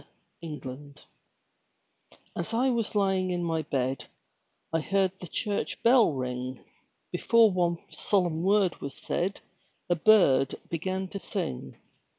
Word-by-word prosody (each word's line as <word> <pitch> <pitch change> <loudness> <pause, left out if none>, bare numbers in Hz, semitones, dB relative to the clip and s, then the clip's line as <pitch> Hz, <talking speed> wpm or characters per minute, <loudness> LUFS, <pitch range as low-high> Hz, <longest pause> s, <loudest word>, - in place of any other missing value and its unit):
THE 160 -3 -6
CHURCH - - -17
BELL 140 +2 -8 1.4
As 175 +7 -2
I 255 +3 +3
was 230 -3 -2
lying 190 -2 +2
in 175 -1 -1
my 165 -1 0
bed 135 -3 -2 0.7
I 165 - +3
heard 195 +3 +1
the 180 - -8
church 205 +5 -3
bell 235 -5 +6
ring; 125 -1 -4 0.5
Before 230 -2 +4
one 175 -2 +1
solemn 175 -5 0
word 195 -2 +2
was 140 -1 -6
said 190 +3 -2 0.5
A - - +5
bird 160 -9 +4 0.2
began 185 +3 -2
to 200 - -6
sing. 65 - -5
175 Hz, 135 wpm, -28 LUFS, 145-200 Hz, 1.4 s, bell